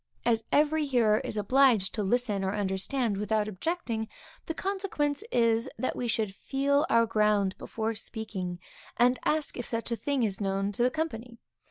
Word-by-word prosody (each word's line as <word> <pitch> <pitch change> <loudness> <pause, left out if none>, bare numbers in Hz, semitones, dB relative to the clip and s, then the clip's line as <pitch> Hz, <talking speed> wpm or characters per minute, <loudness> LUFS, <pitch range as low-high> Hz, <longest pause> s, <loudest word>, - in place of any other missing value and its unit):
As 230 -1 +2
every 300 +1 +3
hearer 230 -5 +3
is - - -5
obliged 225 -2 +4
to 215 - -2
listen 210 -1 0
or 190 +1 -1
understand 205 +3 -1
without 210 +1 0
objecting, 225 - -3 0.4
the 325 - -3
consequence 380 -6 -1
is, 230 -1 +2
that 255 - -2
we 245 - -2
should 215 -3 -1
feel 280 +6 +1
our 230 0 +5
ground 210 -3 +2
before 225 0 -3
speaking, 205 -5 -4 0.4
and 250 +1 +4
ask 305 -1 0
if 245 - -4
such 230 0 -3
or - - +2
such 230 - -4
a - - -32
thing 280 -3 +1
is 205 -2 -1
known 195 0 0
to 205 - -4
the 245 - +4
company. 250 -6 -4
230 Hz, 180 wpm, -29 LUFS, 210-270 Hz, 0.4 s, our